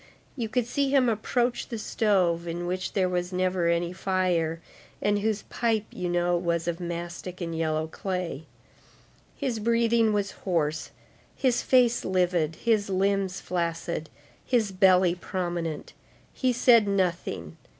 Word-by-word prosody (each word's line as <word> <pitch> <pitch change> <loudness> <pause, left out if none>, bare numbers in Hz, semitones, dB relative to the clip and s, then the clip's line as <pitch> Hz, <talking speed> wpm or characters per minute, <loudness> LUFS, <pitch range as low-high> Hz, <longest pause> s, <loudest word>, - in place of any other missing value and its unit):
You 235 -5 -3
could 245 +1 0
see 275 +3 0
him 265 -2 +4
approach 240 +2 0
the 230 - -5
stove, 185 -6 +1
in 170 +1 -3
which 185 +1 -3
there 190 -2 +2
was 180 0 -2
never 185 -1 0
any 170 +1 +1
fire, 180 -4 0 0.4
and 205 0 +1
whose 215 0 -1
pipe, 225 -3 -1
you 180 -1 -3
know, 175 0 +1
was 170 -1 -1
of 170 0 -2
mastic 175 +1 -5
and 165 -2 -4
yellow 155 -1 0
clay. 175 -2 -4 0.9
His 255 -6 -2
breathing 230 0 +3
was 205 -2 0
hoarse, 160 -4 -1 0.5
his 255 -3 +1
face 245 -2 +3
livid, 175 -4 +1
his 215 -2 +1
limbs 195 0 0
flaccid, 170 -2 -3 0.3
his 230 -6 +1
belly 185 -2 +4
prominent. 175 -3 -4 0.4
He 255 -1 +1
said 235 -3 +5
nothing. 185 -4 -1
185 Hz, 140 wpm, -27 LUFS, 170-220 Hz, 0.9 s, said